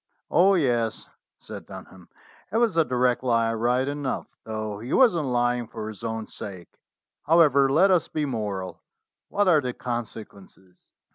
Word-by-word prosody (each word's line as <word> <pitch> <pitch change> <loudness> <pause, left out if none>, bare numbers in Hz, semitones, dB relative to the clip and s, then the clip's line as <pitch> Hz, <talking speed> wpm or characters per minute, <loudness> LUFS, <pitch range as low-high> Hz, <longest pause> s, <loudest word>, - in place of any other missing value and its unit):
"Oh, 195 +3 +5
yes," 120 -8 -1 0.3
said - - -10
Dunham, 95 -2 -12 0.4
"it 220 - 0
was 230 -5 +2
a 165 - +4
direct 125 -2 0
lie 115 -2 +1
right 120 +3 +1
enough, 145 -2 -3 0.2
though 110 -2 -4
he 120 +4 -5
wasn't 175 - +4
lying 120 -1 0
for 110 -1 -7
his 110 0 -9
own 110 -1 -3
sake. 95 -6 -10 0.5
However, 145 -5 +5
let 185 +7 +4
us 180 -3 +2
be 155 -1 -2
moral. 105 -7 -4 0.5
What 205 -1 +1
are 160 -5 +5
the 125 -2 -4
conse 120 -3 -5
quences 95 -2 -20
120 Hz, 155 wpm, -25 LUFS, 110-150 Hz, 0.5 s, Oh